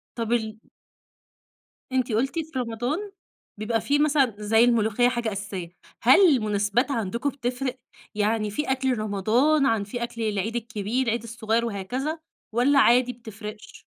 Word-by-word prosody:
طب 230 -1 -3
ال 220 -2 -1 1.3
أنتِ 255 -3 0
قُلتِ 270 +9 0
في 315 -4 -4
رمضان 250 - -3 0.5
بيبقى 225 +1 0
في 285 +5 +1
مثلًا 285 -6 +3
زي 220 +2 +3
الملوخيّة 235 0 +3
حاجة 240 -3 -2
أساسية، 195 -3 -5 0.3
هل 260 +10 +7 0.2
المناسبات 210 +4 0
عندكم 235 +3 -1
بتفرق؟ 255 0 -3 0.4
يعني 215 0 0
في 265 +6 -3
أكل 260 -3 0
رمضان 230 +9 +2
عن 225 -5 +1
في 240 +4 -6
أكل 235 -1 -4
العيد 215 +2 -1
الكبير، 230 +2 -2
العيد 230 +1 0
الصغير 230 0 -1
وهكذا 250 - -3 0.4
والّا 275 +4 +4
عادي 250 -1 +5
بتفرقش؟ 215 -2 -10
235 Hz, 140 wpm, -25 LUFS, 215-255 Hz, 1.3 s, هل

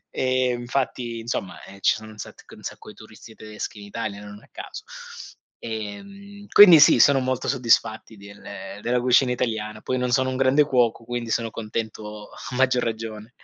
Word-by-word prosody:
ehm, 130 -1 +1
infatti 120 -1 -3
insomma, 115 -5 -4 0.2
ci - - +3
sono 110 0 -10
un 105 - -15
sat - - -10
un - - -16
sacco - - -8
di 105 - -12
turisti 110 +1 -14
tedeschi 105 -1 -8
in 100 - -10
Italia 105 -1 -5
non 105 0 -10
a - - -20
caso. - - -9 0.8
Ehm, 195 - -8
quindi 180 -6 +10
sì, 145 - +7
sono 140 +3 +6
molto 130 -1 -2
soddisfatti 115 -4 +1
del 100 +1 -13 0.4
della 125 +1 +1
cucina 125 +1 +4
italiana, 110 -3 -3
poi 130 - -2
non 125 0 -1
sono 130 +1 +2
un 130 - -3
grande 135 +3 +4
cuoco 120 -5 +1
quindi 120 -1 -4
sono 115 0 0
contento 105 -1 -6
a 125 - -9
maggior 130 -1 +2
ragione. 110 -1 -5
115 Hz, 175 wpm, -23 LUFS, 110-130 Hz, 0.8 s, quindi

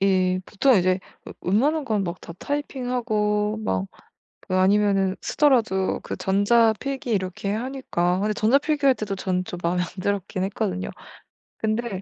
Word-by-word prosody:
이 185 -1 +2
보통 250 +3 +3
이제 185 0 +2 0.2
웨 - - -9
웬만한 280 - +1
건 210 -5 0
막 170 +1 -5
다 170 - -9
타이핑하고 235 -7 -1
막 95 0 -1 0.6
그 185 - -1
아니면은 195 0 +3
쓰더라도 225 -10 +2
그 - - -5
전자 220 +4 +3
필기 275 -2 -4
이렇게 190 0 -2
하니까. 220 -7 -1
근데 210 +2 0
전자 220 +6 +3
필기할 285 -3 +2
때도 210 -2 -3
저는 185 -1 -1
좀 180 - -7
마음에 175 +1 +1
안 180 - -1
들었긴 200 -1 -2
했거든요. 190 -2 -2 0.7
근데 215 -3 -2
205 Hz, 315 characters per minute, -24 LUFS, 185-240 Hz, 0.7 s, 보통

